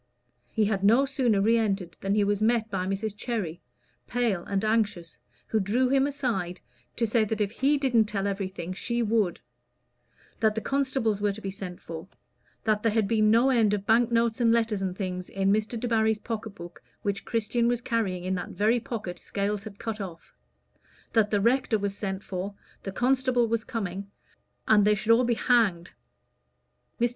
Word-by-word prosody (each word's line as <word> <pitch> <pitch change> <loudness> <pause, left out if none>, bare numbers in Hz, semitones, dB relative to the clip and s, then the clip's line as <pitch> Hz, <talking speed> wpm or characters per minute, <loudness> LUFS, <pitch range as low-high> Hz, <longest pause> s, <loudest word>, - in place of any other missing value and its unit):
He 220 -2 +2
had 200 -2 -1
no 235 +7 +5
sooner 255 -7 +1
re 230 +3 +4
entered 195 -5 -1
than 195 +1 0
he 210 - +3
was 205 0 0
met 225 0 +2
by 185 -2 -1
Mrs. 200 +2 -2
Cherry, 205 -7 -3 0.5
pale 230 -7 0
and 200 +1 -1
anxious, 205 - -1 0.3
who 220 - 0
drew 235 +6 +1
him 270 +1 +3
aside 230 -11 -2 0.4
to 235 - +1
say 225 0 +2
that 215 0 -2
if 205 -1 0
he 275 +5 +2
didn't 245 -5 +3
tell 200 -2 -2
everything 190 -3 -3
she 235 +5 -1
would; 215 -5 +1 1.0
that 215 -1 +2
the - - 0
constables 265 -7 0
were 205 -1 +2
to 210 - -9
be 195 -2 -4
sent 185 -2 -7
for; 165 +1 -8 0.6
that 215 -1 +1
there 225 - +2
had 220 -3 +2
been 215 0 +3
no 235 +5 +5
end 220 -5 +3
of 200 -1 -6
bank 235 +2 +3
notes 230 0 +1
and 230 -1 +4
letters 225 -3 +1
and 185 -1 -3
things 180 -2 -4
in 195 0 +1
Mr. 215 +2 -1
Debarry's 220 -2 +2
pocket 220 -1 -5
book, 175 0 -10 0.2
which 200 0 -2
Christian 235 +1 0
was 240 -1 +1
carrying 200 -7 -1
in 185 +1 -1
that 180 - -3
very 220 +4 +2
pocket 220 -6 -5
Scales 200 +1 -2
had 205 -2 -9
cut 220 -2 -4
off; 175 -4 -9 0.8
that 215 -2 +3
the 205 - +2
rector 235 +1 +2
was 200 -1 -2
sent 195 -1 -4
for, 195 +2 -5 0.3
the 195 - -5
constable 250 +1 +2
was 225 0 -1
coming, 200 -6 -4 0.6
and 210 -2 +6
they 210 +1 +4
should 215 +2 0
all 240 +2 +5
be 235 -1 +1
hanged. 220 -9 +2 1.1
Mr. 240 +1 +3
215 Hz, 190 wpm, -27 LUFS, 195-230 Hz, 1.1 s, and